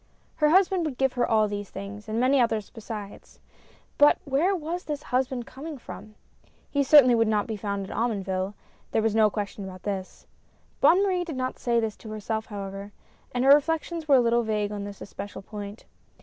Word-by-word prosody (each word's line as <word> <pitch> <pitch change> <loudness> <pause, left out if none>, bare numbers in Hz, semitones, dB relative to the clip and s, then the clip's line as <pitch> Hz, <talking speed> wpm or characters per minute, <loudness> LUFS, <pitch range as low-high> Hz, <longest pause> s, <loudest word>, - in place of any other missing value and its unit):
Her 300 -1 +4
husband 370 +1 +4
would 280 -5 -4
give 265 -1 +1
her 245 -1 +1
all 215 -1 +4
these 205 -1 -5
things, 205 +2 -8
and 220 +2 -1
many 260 +2 +4
others 220 -3 0
besides. 215 -3 -9 0.6
But 290 0 +7
where 305 +8 +2
was 345 +1 -4
this 295 -1 -4
husband 255 -1 0
coming 295 +4 -8
from? 210 -1 -11 0.6
He 285 - +2
certainly 275 -3 +7
would 225 -1 +3
not 210 -1 +1
be 220 - -4
found 200 -1 -3
in - - -9
Omonville 195 -4 -1 0.2
— - - -35
there 220 - +2
was 220 -1 +1
no 215 -1 +5
question 205 -1 -5
about 185 -1 -9
this. 195 -2 -5 0.5
Bonne 370 +4 +5
Marie 370 -3 +1
did 320 -6 -6
not 255 0 -3
say 235 -2 +1
this 220 -2 -2
to 220 - -11
herself 215 +1 -3
however, 200 -1 -7 0.4
and 245 +1 0
her 275 - +9
reflections 325 +2 0
were 280 - +6
a - - +7
little 235 0 +3
vague 210 -2 -1
on 205 -1 -4
this 200 -1 -9
especial 200 0 -8
point. 205 +1 -8
225 Hz, 200 wpm, -26 LUFS, 205-275 Hz, 0.6 s, her